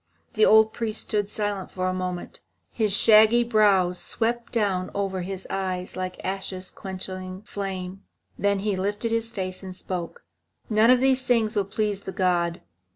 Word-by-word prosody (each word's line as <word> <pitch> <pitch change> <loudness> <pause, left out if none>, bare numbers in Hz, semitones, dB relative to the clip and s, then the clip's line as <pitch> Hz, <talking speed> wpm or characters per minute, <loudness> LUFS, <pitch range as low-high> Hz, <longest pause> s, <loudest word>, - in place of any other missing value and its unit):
The 215 - +4
old 220 0 +6
priest 220 -2 -1
stood 205 -1 -1
silent 205 -3 -2
for 185 -1 -3
a 185 - 0
moment. 180 -1 -5 0.3
His 215 -3 0
shaggy 220 +3 +6
brows 200 -6 +3
swept 235 +1 -1
down 195 -5 0
over 195 -2 -1
his 190 +1 -6
eyes 185 -1 -3
like 185 0 -4
ashes 190 -1 -4
quenching 185 0 -6
flame. 195 -2 -5 0.3
Then 200 0 +1
he 205 -1 0
lifted 205 +4 -1
his 230 0 0
face 185 -3 -5
and 185 -1 -8
spoke. 180 - -6 0.5
"None 215 +2 +5
of 255 0 +5
these 265 -1 +3
things 225 -3 +2
will 200 -2 +1
please 205 0 -2
the 190 - -6
god. 175 -3 0
195 Hz, 160 wpm, -25 LUFS, 185-215 Hz, 0.5 s, old